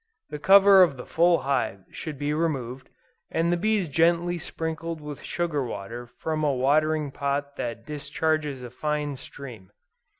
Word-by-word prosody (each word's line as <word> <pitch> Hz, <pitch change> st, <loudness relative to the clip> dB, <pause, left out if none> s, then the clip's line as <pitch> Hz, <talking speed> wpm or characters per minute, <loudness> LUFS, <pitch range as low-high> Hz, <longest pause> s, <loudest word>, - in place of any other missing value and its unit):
The 150 Hz, -, -5 dB
cover 195 Hz, +3 st, +7 dB
of 160 Hz, -7 st, +4 dB
the 125 Hz, -, -8 dB
full 170 Hz, +1 st, +3 dB
hive 125 Hz, -8 st, -1 dB
should 155 Hz, -3 st, -6 dB
be 145 Hz, +2 st, -1 dB
removed, 135 Hz, -5 st, -2 dB, 0.4 s
and 170 Hz, +1 st, +1 dB
the -, -, +3 dB
bees 205 Hz, 0 st, +1 dB
gently 170 Hz, +3 st, +2 dB
sprinkled 160 Hz, 0 st, -4 dB
with 150 Hz, -2 st, -8 dB
sugar 165 Hz, -5 st, -2 dB
water 115 Hz, +2 st, -6 dB
from 155 Hz, +5 st, -3 dB
a 150 Hz, -, +3 dB
watering 150 Hz, +3 st, +2 dB
pot 140 Hz, +1 st, -2 dB
that 115 Hz, -1 st, -4 dB
discharges 150 Hz, -2 st, -2 dB
a 120 Hz, -, -8 dB
fine 150 Hz, +1 st, -2 dB
stream. 125 Hz, -8 st, -10 dB
150 Hz, 155 wpm, -26 LUFS, 135-165 Hz, 0.4 s, cover